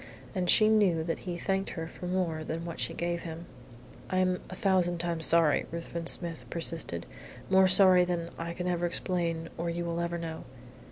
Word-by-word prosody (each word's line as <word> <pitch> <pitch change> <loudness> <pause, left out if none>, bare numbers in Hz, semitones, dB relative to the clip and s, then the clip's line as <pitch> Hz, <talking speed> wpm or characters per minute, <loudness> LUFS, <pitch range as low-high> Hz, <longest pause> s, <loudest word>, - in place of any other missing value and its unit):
And 180 -3 -1
she 215 +3 +7
knew 200 -7 +3
that 165 0 -2
he 175 - -3
thanked 195 +2 -1
her 165 0 -3
for 180 - -8
more 175 -4 -1
than 165 +2 -4
what 170 -1 -6
she - - -1
gave 170 0 -2
him. 165 0 -7 0.6
"I 185 - 0
am 185 -1 +1
a 185 - -7
thousand 185 -3 +2
times 170 -1 -1
sorry," 165 -3 +4
Ruthven 170 0 -5
Smith 170 -3 -2
persisted. 165 - -3 0.5
"More 190 0 +6
sorry 185 -1 +6
than 175 -1 -2
I 170 0 -5
can 180 +1 -4
ever 175 -1 0
explain, 170 -2 -2
or 170 0 -1
you 170 +1 -3
will 170 0 -2
ever 170 0 -1
know." 165 -1 -6
170 Hz, 190 wpm, -30 LUFS, 165-180 Hz, 0.6 s, she